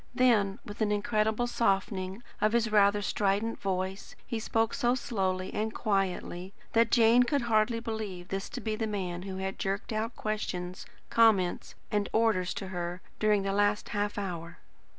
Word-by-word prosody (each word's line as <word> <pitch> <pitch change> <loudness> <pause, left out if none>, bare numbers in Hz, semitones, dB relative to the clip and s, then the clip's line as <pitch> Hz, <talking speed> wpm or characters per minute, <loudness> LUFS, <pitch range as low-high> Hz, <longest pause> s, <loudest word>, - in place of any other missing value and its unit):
Then, 220 -6 +3
with 205 +2 -8
an 210 -1 +2
incredible 215 +2 +1
softening 195 -2 0 0.2
of 215 +1 +3
his 230 -2 +2
rather 205 -1 +4
strident 205 +3 0
voice, 190 0 -3
he 230 - -3
spoke 225 0 0
so 240 +1 +2
slowly 190 -6 -2
and 220 +1 -1
quietly, 190 -2 -1 0.2
that 230 0 +4
Jane 235 +1 +6
could 255 +2 +1
hardly 230 0 +2
believe 215 -6 -5
this 195 0 -3
to 250 +1 -6
be 220 -1 -1
the 220 0 -2
man 185 -4 -3
who 190 0 -6
had 190 0 -4
jerked 195 +3 -2
out 220 +2 -2
questions, 185 -4 -4 0.2
comments, 215 -6 +3 0.2
and 205 -1 0
orders 220 -5 +2
to 195 - -5
her, 175 -1 -4 0.2
during 210 -2 +3
the 195 0 -1
last 205 +1 +1
half 205 0 -1
hour. 175 -4 -5
205 Hz, 165 wpm, -30 LUFS, 190-225 Hz, 0.2 s, Jane